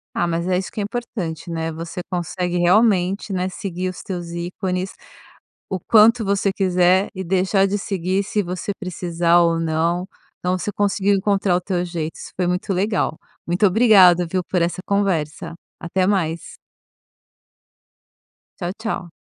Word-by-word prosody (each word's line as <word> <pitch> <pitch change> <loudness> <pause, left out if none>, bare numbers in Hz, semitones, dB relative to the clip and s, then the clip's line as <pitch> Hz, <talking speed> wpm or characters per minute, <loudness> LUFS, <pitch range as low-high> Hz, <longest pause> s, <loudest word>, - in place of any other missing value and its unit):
Ah, - - +1
mas 170 +1 -2
é 180 -1 +2
isso 185 - -4
que - - -6
é 205 - 0
importante, 200 -8 -5
né? 165 0 -2
Você 165 +2 -6
consegue 180 0 -2
realmente, 195 +1 +3
né, 185 -1 -1
seguir 185 -1 -4
os 185 - -8
teus 175 -3 -5
ícones 180 +2 -3 0.8
o 190 - -2
quanto 225 +4 +5
você 200 0 +1
quiser 185 0 +3
e 190 - -4
deixar 190 +2 +2
de 200 +1 0
seguir, 195 0 -1
se 210 +1 -1
você 180 +3 -4
precisar 175 -2 +1
ou 170 -1 +2
não. 165 +3 0 0.3
Então 180 +1 0
você 210 - -3
conseguiu 200 0 +1
encontrar 195 -1 +1
o 180 - 0
teu 180 -1 -1
jeito, 165 -2 -4
isso - - -10
foi 180 - 0
muito 180 +2 -1
legal. 195 -3 0 0.3
Muito 175 +5 +2
obrigado, 185 -4 +6
viu, 185 +1 -1
por 180 -1 -1
essa 175 +2 -1
conversa. 185 -7 -1 0.3
Até 185 +2 0
mais. 170 -5 -1 2.1
Tchau, 175 +1 -2
tchau. 215 -6 -4
185 Hz, 155 wpm, -21 LUFS, 175-195 Hz, 2.1 s, obrigado